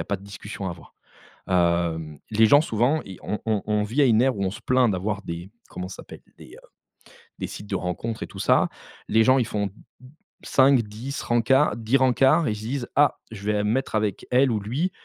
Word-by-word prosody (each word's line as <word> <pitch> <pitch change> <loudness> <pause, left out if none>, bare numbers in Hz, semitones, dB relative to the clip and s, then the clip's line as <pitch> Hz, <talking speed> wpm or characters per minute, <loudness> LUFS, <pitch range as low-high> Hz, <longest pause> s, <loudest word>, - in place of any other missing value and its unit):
a - - -3
pas 100 - -2
de 95 - -16
discussion 100 0 -7
à - - -2
avoir. 85 -1 -12 0.5
Hem, 85 -4 0
les 110 +1 +5
gens 145 +6 +6
souvent, 135 +2 +1
ils 95 -2 -10
on 105 - -3
on 110 -2 0
on 105 -1 +1
vit 115 +8 -1
à - - +6
une 115 -1 +4
ère 130 -3 +2
où 100 - -1
on 95 - 0
se - - -9
plaint 125 -2 +2
d'avoir 100 +2 -3
des 85 +1 -7 0.2
comment 90 - -6
ça 95 - -9
s'appelle? - - -12 0.2
Des, - - -14
heu, - - -16 0.7
des - - -3
sites 105 - -9
de 100 - -3
rencontres 95 +5 -4
et - - -3
tout - - -12
ça, - - +3 0.4
les 110 +1 +4
gens 130 +1 +5
ils 120 - +1
font 105 -3 -2 0.7
5-10 130 -1 +1
rencards, 120 +3 +2
10 115 +3 +2
rencards 135 +5 +3
et - - +1
ils - - -5
se 105 - -9
disent: 120 +2 -4
«Ah 145 +1 +4
je 105 -3 -9
vais 105 0 +1
mettre 120 +3 -1
avec 105 -3 -1
elle 130 +1 +4
ou 110 - 0
lui» 140 - -2
110 Hz, 225 wpm, -24 LUFS, 100-130 Hz, 0.7 s, gens